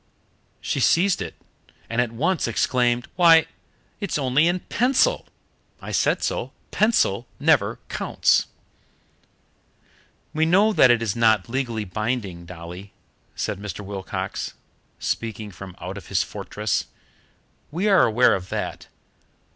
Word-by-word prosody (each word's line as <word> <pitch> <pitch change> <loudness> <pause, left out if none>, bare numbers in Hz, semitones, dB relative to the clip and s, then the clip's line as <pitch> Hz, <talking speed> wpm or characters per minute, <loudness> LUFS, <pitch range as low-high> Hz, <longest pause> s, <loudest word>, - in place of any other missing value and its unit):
She - - -2
seized 185 +2 +3
it, - - -5 0.5
and 115 +1 +1
at 120 -2 -2
once 160 +8 0
exclaimed: 120 +2 +1
"Why, 165 -3 +7 0.5
it's 200 -7 -2
only 140 +3 +3
in 175 +1 0
pencil! 265 - +1 0.5
I - - -8
said - - +1
so. - - -2 0.2
Pencil 125 - +2
never 120 -9 +3
counts." - - +1 1.9
"We 155 - +1
know 200 +6 +4
that 130 - +6
it 120 -1 +3
is 105 -4 -1
not 110 -2 +3
legally 120 -4 -2
binding, 100 -4 -3
Dolly," 90 +3 -9 0.4
said - - -3
Mr. 100 -1 -6
Wilcox, 95 -1 -5 0.4
speaking 110 -2 -3
from 95 0 -10
out 95 +2 -6
of 85 - -16
his - - +1
fortress. - - -3 0.8
"We 180 +8 -1
are 195 -3 +6
aware 120 +3 +4
of 90 -1 -4
that. - - -4
120 Hz, 125 wpm, -23 LUFS, 100-160 Hz, 1.9 s, Why